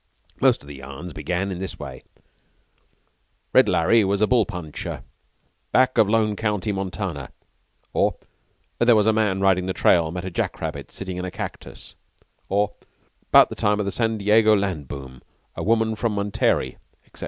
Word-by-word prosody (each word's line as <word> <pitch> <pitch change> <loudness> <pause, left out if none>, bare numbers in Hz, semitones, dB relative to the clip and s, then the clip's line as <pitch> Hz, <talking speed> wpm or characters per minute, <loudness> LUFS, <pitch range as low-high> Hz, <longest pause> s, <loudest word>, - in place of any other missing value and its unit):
Most - - +3
of - - -15
the 70 -1 -9
yarns 70 +6 -9
began 90 +6 -2
in 90 - -5
this 95 -1 -5
way: 65 -1 -8 1.5
"Red - - +6
Larry 110 +7 +4
was 100 +1 0
a 110 - +4
bull 115 -3 +2
puncher 80 -4 -6 0.7
back 130 0 +3
of 105 - +5
Lone 110 -1 +2
County, 105 -1 -1
Montana," 95 -7 -4 0.6
or - - +2 0.6
"There 120 -1 +5
was 105 -1 +3
a 110 - +4
man 105 -3 +1
riding 95 -2 +2
the 95 - -1
trail 85 -3 +3
met 90 +2 -5
a 95 - -4
jack - - -2
rabbit - - -5
sitting 95 -2 -6
in 90 - -3
a - - -3
cactus," - - -8 0.6
or 100 +1 +1 0.6
"'Bout - - +7
the - - -6
time 105 0 +1
of 105 - -1
the 100 - -2
San 115 0 0
Diego 110 +1 +4
land 95 -8 -2
boom, 65 -2 -9 0.3
a - - -5
woman 110 0 +2
from 110 0 -1
Monterey," 100 -10 0 0.3
etc. - - -14
95 Hz, 175 wpm, -23 LUFS, 90-110 Hz, 1.5 s, Bout